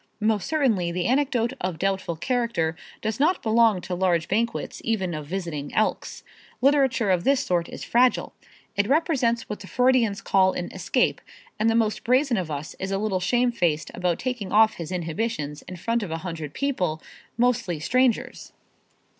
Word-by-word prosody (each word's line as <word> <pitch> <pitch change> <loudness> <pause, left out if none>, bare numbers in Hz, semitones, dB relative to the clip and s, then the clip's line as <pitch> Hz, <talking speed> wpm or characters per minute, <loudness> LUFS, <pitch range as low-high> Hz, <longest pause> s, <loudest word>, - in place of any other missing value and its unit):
Most 215 -3 +1
certainly 230 - +1
the 175 0 -2
anecdote 255 -2 +1
of 180 -3 -2
doubtful 190 -2 -1
character 235 -6 -1 0.3
does 220 +1 -2
not 325 +6 +2
belong 220 -3 +3
to 180 - -5
large 175 -3 +1
banquets 230 +4 -2
even 190 -6 -1
of 150 -2 -6
visiting 165 -5 -4
Elks. 215 - -1 0.4
Literature 265 -6 +3
of 180 -2 +1
this 275 +2 +3
sort 175 -2 -1
is - - -8
fragile. 250 +1 +2 0.4
It 205 0 +1
represents 265 -6 +1
what 210 - -5
the 195 - -10
Freudians 250 -5 +2
call 190 -1 +3
an 175 - -4
escape, 190 +7 0 0.4
and 220 +1 +3
the 225 - +2
most 220 -2 +1
brazen 255 0 +2
of 180 -4 -2
us 145 0 -5
is 190 - -3
a 195 - 0
little 200 -2 -1
shamefaced 185 -7 +1
about 180 -2 0
taking 245 -6 -4
off 220 +1 +5
his 165 0 -6
inhibitions 165 -3 -3
in 185 - -7
front 230 +6 -1
of 205 - -4
a 165 - -2
hundred 160 -4 -5
people, 190 - -1 0.4
mostly 235 -9 +1
strangers. 250 +7 0
210 Hz, 170 wpm, -25 LUFS, 175-240 Hz, 0.4 s, off